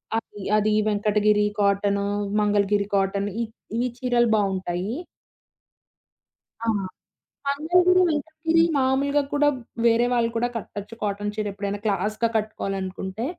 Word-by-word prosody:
అది 215 -2 -5 0.2
అది 215 0 +2 0.2
Venkatagiri 210 0 +2
cotton, 200 0 +2 0.4
Mangalagiri 205 -1 +2
cotton 195 +1 0
ఈ - - +1 0.4
ఈ - - +2 0.2
చీరలు 240 -2 +2
బావుంటాయి. 190 - -1 1.7
ఆ! - - -3 0.8
మంగళగిరి, 355 +6 +3
వెంకటగిరి, 320 +2 +1
మామూలుగా 275 +2 +2
కూడా 290 0 +3 0.4
వేరే 235 +1 +4
వాళ్ళు 235 -1 +2
కూడా 240 +1 +1
కట్టొచ్చు 210 0 -7
కాటన్ 205 0 -1
చీర 215 -1 -2
ఎప్పుడైనా 200 0 -4
క్లాస్‌గా 215 +3 0
కట్టుకోవాలనుకుంటే 195 -1 -3
210 Hz, 110 wpm, -24 LUFS, 200-245 Hz, 1.7 s, వేరే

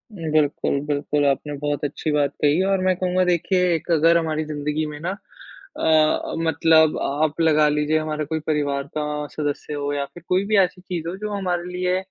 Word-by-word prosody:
बिल्कुल, 155 -4 0
बिल्कुल 145 0 0
आपने 140 +2 -1
बहुत 145 0 -2
अच्छी 150 +2 -3
बात 145 -1 +1
कही। 150 +4 +3
और 195 0 +1
मैं 185 0 +2
कहूँगा 185 0 +1
देखिए 180 0 +2
एक 160 +2 -6
अगर 165 +1 +5
हमारी 155 -2 -1
ज़िंदगी 150 +1 -2
में 150 -1 -7
ना 175 +3 -3 0.7
अ, 155 -1 +2
मतलब 160 -1 +3
आप 155 +3 0
लगा 155 -2 +4
लीजिए 150 +1 +1
हमारा 155 -1 -3
कोई 160 +2 -2
परिवार 145 -2 0
का 150 - 0 0.3
सदस्य 150 0 -3
हो 145 0 -2
या 140 -1 -1
फिर 175 - -12
कोई 185 +2 +2
भी 215 0 +2
ऐसी 185 -1 +2
चीज़ 175 -3 -5
हो 175 - -3
जो 210 +1 -5
हमारे 180 -3 -1
लिए 180 0 0
155 Hz, 190 wpm, -22 LUFS, 150-180 Hz, 0.7 s, अगर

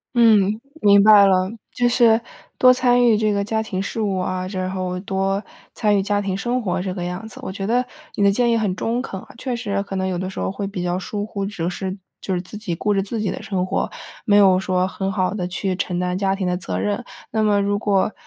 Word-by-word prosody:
嗯， 215 -2 +4 0.2
明 200 -4 +6
白 210 -1 +8
了， 185 -1 +3 0.2
就 245 0 +1
是 235 -2 +4 0.4
多 255 - +8
参 245 -1 +3
与 230 -3 +5
这 215 -1 +1
个 200 0 0
家 220 +2 -1
庭 190 -3 -3
事 200 - -4
务 200 -3 0
啊， 185 0 -2
之 185 -1 -3
后 185 -1 -3
多 195 +1 -1 0.3
参 210 -2 +2
与 195 - +1
家 205 +1 0
庭 195 -2 -2
生 240 +5 -1
活 190 -6 -1
这 185 -1 -3
个 180 -2 -4
样 180 +5 -5
子。 220 - -11
我 - - -5
觉 195 0 -5
得 245 +4 +2 0.3
你 205 - 0
的 200 - +5
建 240 +3 +2
议 - - +3
很 205 -5 0
中 230 +5 -1
肯， 195 -7 -6
呃， - - -14
确 255 -2 -2
实 205 -4 -2
可 200 -1 -6
能 190 0 -1
有 180 -2 -2
的 185 0 -3
时 190 - -7
候 - - -1
会 195 0 -4
比 195 -2 -4
较 180 +1 -1
疏 205 +2 -4
忽， 200 -2 -4
只 175 -5 -3
是 185 +2 -4 0.2
就 190 - -2
是 - - -1
自 200 +3 -9
己 195 -6 -3
顾 205 +5 0
着 195 - +2
自 210 +4 -4
己 210 -2 -1
的 - - -6
生 190 -2 -2
活， - - -1 0.3
没 205 - +3
有 190 -2 +6
说 185 -1 0
很 190 0 -3
好 185 -2 0
地 180 -4 -3
去 185 +1 -2
承 180 -1 -2
担 180 0 -1
家 195 0 +1
庭 195 -1 -3
的 180 0 0
责 95 - -4
任。 100 +1 -1 0.3
那 220 - 0
么 210 -1 +3
如 200 0 0
果 200 -1 +1
195 Hz, 275 characters per minute, -21 LUFS, 185-215 Hz, 0.4 s, 白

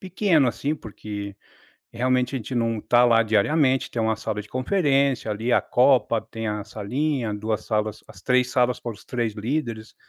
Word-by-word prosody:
pequeno 185 -7 +2
assim, 145 +5 -2
porque 100 -5 -8 0.6
realmente 125 +2 0
a - - 0
gente 115 +2 -8
não 115 -2 0
está 120 +3 +3
lá 115 -1 +5
diariamente, 130 +5 +2
tem 115 - -1
uma 110 0 +1
sala 110 -1 -4
de 105 - -17
conferência 135 - +1
ali, 110 +4 -1
a - - +5
copa, 125 -3 +3
tem 115 0 -6
a 105 -1 -3
salinha, 120 +4 -2
2 110 +1 -3
salas 110 -1 -2
as - - -14
3 125 0 +2
salas 125 0 +1
para 120 - -5
os 105 - -16
3 120 -4 -2
líderes. 115 -1 -3
120 Hz, 180 wpm, -24 LUFS, 110-130 Hz, 0.6 s, lá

